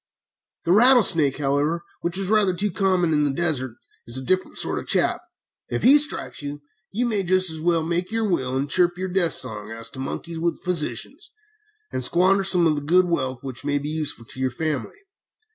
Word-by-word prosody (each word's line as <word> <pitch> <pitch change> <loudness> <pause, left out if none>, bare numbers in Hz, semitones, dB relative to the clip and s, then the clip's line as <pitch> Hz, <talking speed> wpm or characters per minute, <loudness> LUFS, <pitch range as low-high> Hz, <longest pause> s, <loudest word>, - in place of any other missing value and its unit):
The 170 - +1
rattlesnake, 195 - +5
however, 145 +4 -1 0.2
which 170 +2 -2
is 195 0 -1
rather 205 -4 +3
too 200 +3 -1
common 185 -3 +1
in 150 -1 +2
the 145 - +1
desert, 135 -7 -1 0.3
is 120 +2 -2
a 130 - -5
different 185 +4 -1
sort - - 0
of - - -9
a - - -26
chap. - - +1 0.5
If - - -3
he 280 +4 +7
strikes 290 - -1
you, 145 0 -7 0.3
you 235 +5 -1
may 215 -4 0
just 185 -1 +2
as 160 -1 -6
well 165 -1 +1
make 175 +4 -2
your 225 -1 -1
will, 130 -8 -1
and 140 +2 -2
chirp 175 +3 +1
your 190 +1 -4
death 180 -2 +2
song, 105 -4 -2
as 115 0 -7
to 130 - -10
monkey 165 +5 -5
with 170 +1 -2
physicians, 180 - -3 0.6
and 130 - -3
squander 185 +7 +3
some 180 -3 +4
of 160 - +3
the 145 - -3
good 180 +5 +3
wealth 130 -7 -3
which 130 -2 -7
may 145 0 0
be 145 +1 -4
useful 155 -6 -3
to 120 - -9
your 130 0 0
family." 155 - -4
170 Hz, 210 wpm, -23 LUFS, 140-185 Hz, 0.6 s, he